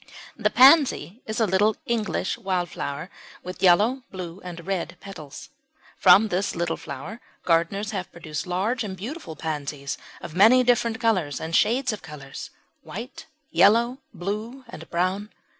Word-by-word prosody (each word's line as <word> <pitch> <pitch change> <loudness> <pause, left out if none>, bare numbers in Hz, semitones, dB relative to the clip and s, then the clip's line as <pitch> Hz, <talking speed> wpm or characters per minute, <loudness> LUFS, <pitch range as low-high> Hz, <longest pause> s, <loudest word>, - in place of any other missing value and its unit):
The 215 -2 +1
Pansy 255 - +5
is 220 +1 -3
a 225 - +4
little 205 +2 +2
English 220 -5 -1
wild 180 -3 -2
flower 145 +6 -5 0.3
with 180 0 -8
yellow, 210 +8 +4
blue, 185 0 -7
and 175 -2 -8
red 185 -2 -3
petals. 155 -8 -10 0.5
From 215 +2 +7
this 190 +2 -1
little 170 -1 -1
flower 160 - -8 0.2
gardeners 180 +5 +1
have 190 -4 -4
produced 160 -1 -6
large 210 +7 -1
and 190 -3 -6
beautiful 235 - -7
pansies 145 -3 -4 0.2
of - - -9
many 225 +8 +6
different 235 -2 +2
colours 185 - +1
and 160 +1 -3
shades 250 +3 +2
of 210 - -7
colours 150 -3 -9 0.3
white, 255 - -8 0.2
yellow, 235 +5 +4
blue, 215 +7 -5
and 165 -6 -10
brown. 185 +4 -1
195 Hz, 145 wpm, -25 LUFS, 170-225 Hz, 0.5 s, From